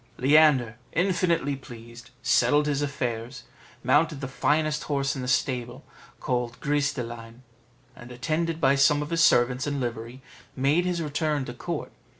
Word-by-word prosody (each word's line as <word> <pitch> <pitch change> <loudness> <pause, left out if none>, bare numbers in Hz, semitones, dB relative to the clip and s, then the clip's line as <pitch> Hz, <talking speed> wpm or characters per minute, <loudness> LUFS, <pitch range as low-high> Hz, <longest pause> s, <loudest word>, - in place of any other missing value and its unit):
Leander, 135 -4 +4 0.2
infinitely 170 -4 +1
pleased, 115 -2 -12
settled 145 +2 +3
his 145 -1 0
affairs, 125 -3 -4 0.4
mounted 150 -1 +2
the 135 - -4
finest 150 +3 0
horse 140 -2 -1
in 135 - -5
the 125 - -5
stable, 125 -2 -1 0.3
called 125 -1 -2
Gris 145 -1 0
de 125 - -4
line, 115 +1 -10 0.5
and 120 +1 -12
attended 155 +6 -2
by 135 -2 +4
some 145 +1 +3
of 150 - -9
his 165 0 +1
servants 125 -3 +3
in 145 -1 -2
livery, 120 +1 -5 0.3
made 145 +7 +2
his 175 -2 -1
return 150 -2 -1
to 120 - -7
court. 160 +5 -5
140 Hz, 155 wpm, -26 LUFS, 125-150 Hz, 0.5 s, Leander